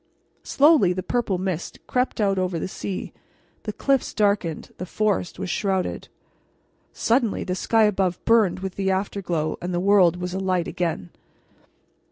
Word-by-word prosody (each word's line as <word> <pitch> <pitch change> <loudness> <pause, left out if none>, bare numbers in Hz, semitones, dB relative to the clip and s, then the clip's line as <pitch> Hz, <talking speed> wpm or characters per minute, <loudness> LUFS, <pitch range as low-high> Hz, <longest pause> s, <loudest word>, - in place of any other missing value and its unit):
Slowly 280 - +4
the 185 +1 -4
purple 225 -6 -1
mist 180 -2 -3
crept 250 -1 -1
out 195 -2 +2
over 185 -2 -1
the 165 - -3
sea; 190 0 -5 0.5
the 215 - -2
cliffs 270 +4 0
darkened; 200 -6 0
the 180 - -4
forest 205 -3 -1
was 175 - -4
shrouded. 190 -2 -1 0.8
Suddenly 230 -2 +1
the 180 - -2
sky 225 +4 +2
above 190 -4 +1
burned 215 -5 +3
with 190 -1 -5
the 195 -1 0
afterglow, 185 -5 -2
and 180 0 -3
the - - +1
world 185 -3 +4
was 180 0 -4
alight 185 -2 0
again. 165 - -3
190 Hz, 150 wpm, -24 LUFS, 180-210 Hz, 0.8 s, Slowly